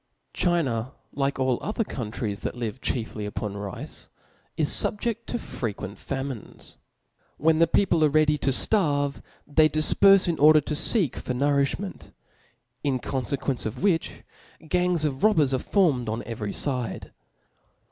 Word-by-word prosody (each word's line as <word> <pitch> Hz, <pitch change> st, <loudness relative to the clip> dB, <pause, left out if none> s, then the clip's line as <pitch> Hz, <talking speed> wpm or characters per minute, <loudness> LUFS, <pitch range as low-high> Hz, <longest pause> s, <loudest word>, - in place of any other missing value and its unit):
China, 135 Hz, -9 st, 0 dB, 0.2 s
like 140 Hz, 0 st, -1 dB
all 130 Hz, -2 st, +1 dB
other 215 Hz, +2 st, -1 dB
countries 110 Hz, -, -4 dB
that -, -, -4 dB
live 120 Hz, 0 st, -5 dB
chiefiy 110 Hz, -4 st, -3 dB
upon 105 Hz, 0 st, -4 dB
rice, 100 Hz, -2 st, -7 dB, 0.5 s
is 155 Hz, -3 st, +2 dB
fubjeft 230 Hz, +2 st, -1 dB
to -, -, -2 dB
frequent 105 Hz, -, -6 dB
famines. 135 Hz, -4 st, -6 dB, 0.6 s
When 160 Hz, +1 st, +2 dB
the 165 Hz, -, +5 dB
people 170 Hz, -2 st, +2 dB
are 155 Hz, -, +5 dB
ready 150 Hz, 0 st, +3 dB
to 140 Hz, -, 0 dB
ftarve, 145 Hz, -, +1 dB, 0.2 s
they 155 Hz, +1 st, +4 dB
difperfe 190 Hz, +6 st, +5 dB
in 170 Hz, -3 st, -1 dB
order 155 Hz, +2 st, +7 dB
to 150 Hz, -, -4 dB
ftek 165 Hz, -, +3 dB
for 125 Hz, -, -4 dB
nourifhment; 140 Hz, +8 st, -1 dB, 0.7 s
in 140 Hz, -3 st, +1 dB
confequence 135 Hz, 0 st, -2 dB
of 110 Hz, -, -7 dB
which, 180 Hz, -5 st, 0 dB, 0.4 s
gangs 180 Hz, -2 st, +1 dB
of 135 Hz, -3 st, -3 dB
robbers 160 Hz, -11 st, +4 dB
are 130 Hz, -, +1 dB
formed 140 Hz, -, +1 dB
on 110 Hz, +2 st, -3 dB
every 110 Hz, -3 st, -4 dB
fide. 125 Hz, -3 st, -3 dB
140 Hz, 140 wpm, -25 LUFS, 125-165 Hz, 0.7 s, order